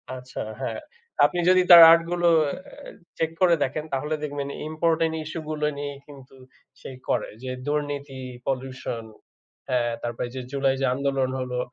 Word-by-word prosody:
আচ্ছা। 125 Hz, 0 st, -7 dB, 0.2 s
হ্যাঁ। 135 Hz, -, -3 dB, 0.5 s
আপনি 175 Hz, -, 0 dB
যদি 185 Hz, 0 st, +6 dB
তার 170 Hz, -1 st, +12 dB
আর্ট 165 Hz, 0 st, +6 dB
গুলো 175 Hz, 0 st, +1 dB, 0.2 s
এ্যা 145 Hz, -, -8 dB, 0.3 s
চেক 160 Hz, -1 st, 0 dB
করে 175 Hz, -2 st, +5 dB
দেখেন 145 Hz, +3 st, -3 dB
তাহলে 150 Hz, +3 st, -1 dB
দেখবেন 145 Hz, -1 st, -4 dB, 0.2 s
ইম্পোর্টেন্ট 160 Hz, 0 st, +1 dB
ইসূ 155 Hz, +2 st, -6 dB
গুলো 150 Hz, -1 st, -2 dB
নিয়েই 145 Hz, -1 st, -5 dB
কিন্তু 135 Hz, -2 st, -14 dB, 0.5 s
সেই 130 Hz, -, -9 dB
করে। -, -, 0 dB
যে, 130 Hz, -, -4 dB, 0.2 s
দুর্নীতি, 145 Hz, -2 st, -3 dB, 0.3 s
পলিউশন 130 Hz, -3 st, -4 dB, 0.7 s
হ্যাঁ, 120 Hz, -2 st, +1 dB
তারপরে 120 Hz, +1 st, -3 dB
যে, 130 Hz, -, -4 dB
জুলাই 135 Hz, -1 st, +1 dB
যে, -, -, +2 dB
আন্দোলন 135 Hz, -1 st, 0 dB
হলো 125 Hz, -1 st, -3 dB
140 Hz, 155 wpm, -25 LUFS, 130-155 Hz, 0.7 s, তার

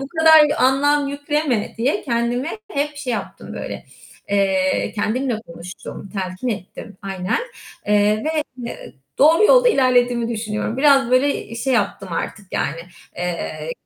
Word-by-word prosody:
Bu 275 Hz, -, -5 dB
kadar 315 Hz, -1 st, +8 dB
anlam 280 Hz, +2 st, +3 dB
yükleme 285 Hz, -5 st, -1 dB
diye 250 Hz, +5 st, 0 dB
kendime 245 Hz, -, -1 dB
hep 290 Hz, +1 st, -2 dB
şey 260 Hz, -4 st, -3 dB
yaptım 205 Hz, -4 st, -6 dB
böyle, -, -, -6 dB, 0.5 s
eee, 190 Hz, -2 st, +1 dB
kendimle 230 Hz, +2 st, -1 dB
konuştum, 175 Hz, +3 st, -9 dB
telkin 190 Hz, +4 st, -3 dB
ettim. 205 Hz, 0 st, -6 dB
Aynen. 190 Hz, -, -2 dB, 0.5 s
Eee, 210 Hz, +2 st, +2 dB
ve, 310 Hz, -1 st, 0 dB, 0.2 s
eee, -, -, -9 dB, 0.2 s
doğru 320 Hz, +8 st, +6 dB
yolda -, -, +6 dB
ilerlediğimi 245 Hz, -, +2 dB
düşünüyorum. 220 Hz, 0 st, -3 dB
Biraz 275 Hz, -3 st, +4 dB
böyle, 275 Hz, +3 st, +3 dB
iii, 230 Hz, -, -9 dB
şey 265 Hz, +3 st, -1 dB
yaptım 200 Hz, -3 st, -1 dB
artık 200 Hz, +4 st, -4 dB
yani, 165 Hz, +4 st, -2 dB, 0.4 s
eee, 165 Hz, -3 st, -4 dB
240 Hz, 135 wpm, -20 LUFS, 200-285 Hz, 0.5 s, kadar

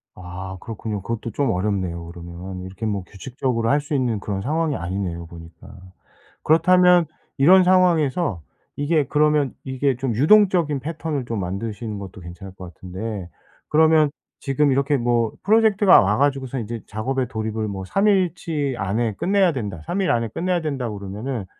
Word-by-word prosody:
아 95 Hz, +1 st, -7 dB
그렇군요. 110 Hz, -1 st, -5 dB
그것도 115 Hz, +2 st, -4 dB
좀 140 Hz, -2 st, 0 dB
어렵네요 90 Hz, -3 st, -2 dB
그러면 85 Hz, +2 st, -8 dB
이렇게 95 Hz, +4 st, -7 dB
뭐 100 Hz, -3 st, -2 dB
규칙적으로 115 Hz, +2 st, -3 dB
할 145 Hz, +1 st, +3 dB
수 145 Hz, +1 st, -6 dB
있는 120 Hz, -5 st, 0 dB
그런 100 Hz, -1 st, -4 dB
상황이 155 Hz, +3 st, 0 dB
아니네요 85 Hz, -3 st, -4 dB
보니까. 85 Hz, +4 st, -13 dB, 0.7 s
그렇다면 180 Hz, +2 st, +5 dB, 0.3 s
이런 185 Hz, +7 st, +6 dB
상황에서 170 Hz, -, +2 dB, 0.3 s
이게 145 Hz, 0 st, +1 dB
그러면 150 Hz, -1 st, +2 dB
이게 130 Hz, 0 st, 0 dB
좀 130 Hz, -2 st, -2 dB
유동적인 170 Hz, -, +4 dB
패턴을 155 Hz, -2 st, -4 dB
좀 115 Hz, -3 st, -3 dB
만드시는 105 Hz, +3 st, -4 dB
것도 95 Hz, -1 st, -9 dB
괜찮을 90 Hz, +3 st, -10 dB
것 90 Hz, -2 st, -10 dB
같은데 95 Hz, +2 st, -6 dB, 0.4 s
그러면 155 Hz, -1 st, +4 dB, 0.3 s
지금 140 Hz, +1 st, +1 dB
이렇게 140 Hz, +1 st, +2 dB
뭐 120 Hz, -2 st, +1 dB
프로젝트가 210 Hz, -2 st, +5 dB
와 105 Hz, +2 st, +1 dB
가지고서는 135 Hz, -3 st, 0 dB
인제 115 Hz, -1 st, -6 dB
작업에 125 Hz, +4 st, -2 dB
돌입을 110 Hz, -1 st, -3 dB
뭐 95 Hz, -2 st, -5 dB
3 195 Hz, -, +1 dB
일치 165 Hz, -7 st, 0 dB
안에 110 Hz, +3 st, -1 dB
끝내야 190 Hz, -, +2 dB
된다 100 Hz, -, -5 dB
3 195 Hz, -, -1 dB
일 185 Hz, -, +2 dB
안에 115 Hz, -1 st, +1 dB
끝내야 175 Hz, -, -1 dB
된다고 125 Hz, -9 st, -3 dB
그러면은 105 Hz, +3 st, -5 dB
120 Hz, 365 characters per minute, -22 LUFS, 100-150 Hz, 0.7 s, 이런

